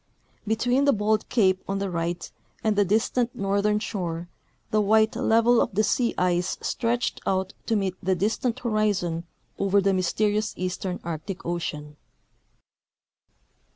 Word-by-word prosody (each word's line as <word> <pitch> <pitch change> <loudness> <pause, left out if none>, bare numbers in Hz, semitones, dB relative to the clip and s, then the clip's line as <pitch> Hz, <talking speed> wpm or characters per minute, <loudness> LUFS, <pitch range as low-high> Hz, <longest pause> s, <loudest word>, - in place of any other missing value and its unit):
Between 245 +5 +2
the 280 - +5
bold 215 0 0
cape 190 -5 +3
on 195 - -1
the 195 -1 -2
right 170 0 -3 0.3
and 215 -1 +2
the 205 - +4
distant 225 +4 +1
northern 200 +1 +1
shore 175 -6 -4 0.4
the 215 - +3
white 220 +1 +3
level 230 +1 +4
of - - -2
the 215 - +3
sea 235 +3 +1
ice 180 -1 +1
stretched 240 +1 -1
out 190 0 0
to 225 - +2
meet 195 -3 0
the 190 +1 +1
distant 225 +6 -1
horizon 205 -7 0 0.3
over 195 0 +3
the 195 0 +2
mj^'sterious 205 +4 0
eastern 185 0 -3
Arctic 170 +3 -5
ocean." 150 -4 -4
200 Hz, 140 wpm, -25 LUFS, 180-220 Hz, 0.4 s, the